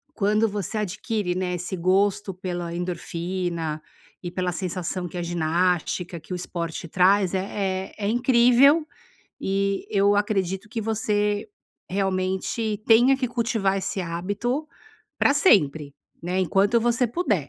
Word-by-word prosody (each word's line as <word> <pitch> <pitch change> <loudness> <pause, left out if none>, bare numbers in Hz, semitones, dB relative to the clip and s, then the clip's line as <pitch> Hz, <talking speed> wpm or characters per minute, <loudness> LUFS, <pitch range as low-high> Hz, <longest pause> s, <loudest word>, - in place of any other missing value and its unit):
quando 215 +2 +2
você 205 +1 -3
adquire, 205 -1 -2
né, 180 -1 -1
esse 180 +2 -4
gosto 195 +3 +1
pela 175 -2 -4
endorfina 170 -2 -3 0.4
e 175 - -4
pela 180 0 -1
sensação 180 0 -3
que 175 - -8
a 175 - -2
ginástica 175 +1 0
que 160 +4 -8
o - - -1
esporte 170 -2 -5
traz, 185 +2 +3
é 190 0 -2
é - - -20
é 200 - -1
incrível 250 +5 +5 0.6
e 195 0 -1
eu 200 0 +3
acredito 195 -1 -1
que 225 +1 -4
você 210 -1 0 0.4
realmente 190 +3 -1
tenha 240 +4 +6
que 265 -1 -1
cultivar 230 -5 0
esse 195 0 -3
hábito 205 - -2 0.5
pra 285 - +4
sempre, 155 - +3 0.3
né, 180 +2 -1
enquanto 195 +6 +3
você 240 +1 +2
puder. 215 - -1
195 Hz, 135 wpm, -24 LUFS, 180-215 Hz, 0.6 s, tenha